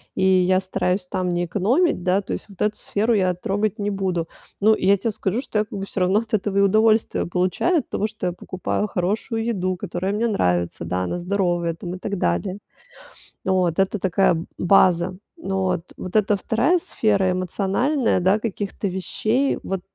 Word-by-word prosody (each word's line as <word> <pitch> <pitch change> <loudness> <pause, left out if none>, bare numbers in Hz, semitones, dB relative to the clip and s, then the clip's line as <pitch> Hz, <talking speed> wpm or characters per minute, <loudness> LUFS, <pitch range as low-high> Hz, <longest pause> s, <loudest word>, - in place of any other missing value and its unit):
и - - 0
я 185 0 +4
стараюсь 185 0 -1
там 185 0 -2
не 175 0 0
экономить. 210 - +1
Да, 185 +2 +2
то 195 - -5
есть - - -5
вот 195 - -12
эту 210 0 +1
сферу 220 +4 0
я 185 -4 +2
трогать 205 +4 -2
не 205 0 -1
буду. 185 -4 -1 0.3
Ну, 215 +2 +5
я 200 0 +3
те 220 +4 -1
скажу, 205 +3 -2
что 220 -5 -2
я 210 - +1
как 205 - -8
бы 195 - -3
всё 200 - -5
равно 185 +3 +3
от 225 -1 -9
этого 200 -1 0
и - - +5
удовольствие 215 +3 +3
получаю- 185 - +1
от - - -8
того, 210 - -1
что 215 -4 -4
я - - 0
покупаю 185 +3 -3
хорошую 210 +5 -2
еду, 185 -5 -1
которая 185 +2 -3
мне 225 +3 +1
нравится. 90 - 0
Да, 90 +2 -1
она 90 - -2
здоровая 175 -2 0
там 175 +2 -6
и - - -7
так 200 +1 -3
далее. 85 - -1 0.9
Вот 185 -3 +1
это 195 +2 +1
такая 185 -1 +2 0.2
база. 180 -1 +3 0.2
Но 195 - -2
вот, 180 -2 -2
вот 185 +2 -7
это 210 -1 +3
2 250 - +2
сфера- 205 - +1
эмоциональная, 195 - 0
да, 190 +4 +3
каких-то 205 -2 -3
вещей. 215 +8 0
Вот 190 -1 -3
195 Hz, 190 wpm, -22 LUFS, 180-215 Hz, 0.9 s, Ну